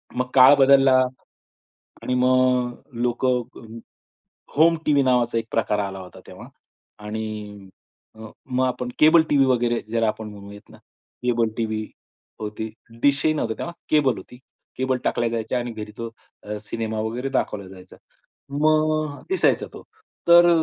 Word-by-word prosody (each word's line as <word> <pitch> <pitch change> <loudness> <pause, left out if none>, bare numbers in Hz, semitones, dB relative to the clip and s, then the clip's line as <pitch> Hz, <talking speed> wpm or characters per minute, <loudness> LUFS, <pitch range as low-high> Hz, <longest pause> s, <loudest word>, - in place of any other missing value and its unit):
मग 125 0 -1
काळ 130 +2 +8
बदलला 135 -1 +5 1.1
आणि 125 - -1
मग 125 -1 +2 0.3
लोकं 125 +1 +1 1.1
होम 165 +2 +5
टीव्ही 145 -2 +3
नावाचा 120 -2 +2
एक 115 - -2
प्रकार 105 -2 0
आला 95 -1 -4
होता 90 -1 -12
तेव्हा. - - -11 0.6
आणि 105 -2 -6 0.8
मग 130 0 0
आपण 125 -1 -3
केबल 160 +1 +6
टीव्ही 140 -2 +4
वगैरे 120 -2 +1
ज्याला 115 -1 +1
आपण 110 0 -3
म्हणूयात 100 0 -12
ना, - - -15 0.5
केबल 120 -2 +1
टीव्ही 110 -1 -2 0.5
होती, 110 +1 -5 0.3
डिशही 145 +2 +3
नव्हता 115 -7 -2
तेव्हा. 170 - -5 0.2
केबल 145 -4 +3
होती. 125 - -12 0.4
केबल 130 0 0
टाकल्या 115 - 0
जायच्या 115 +2 -2
आणि 120 0 -4
घरी 105 -1 -7
तो 115 0 -5 0.3
अ, 105 0 -5
सिनेमा 110 0 -4
वगैरे 120 +5 -3
दाखवला 105 -7 -2
जायचा. 95 -1 -14 0.5
मग 155 0 +1
दिसायचा 380 - +1
तो. - - -11 0.4
तर 175 0 +8
125 Hz, 135 wpm, -23 LUFS, 110-135 Hz, 1.1 s, काळ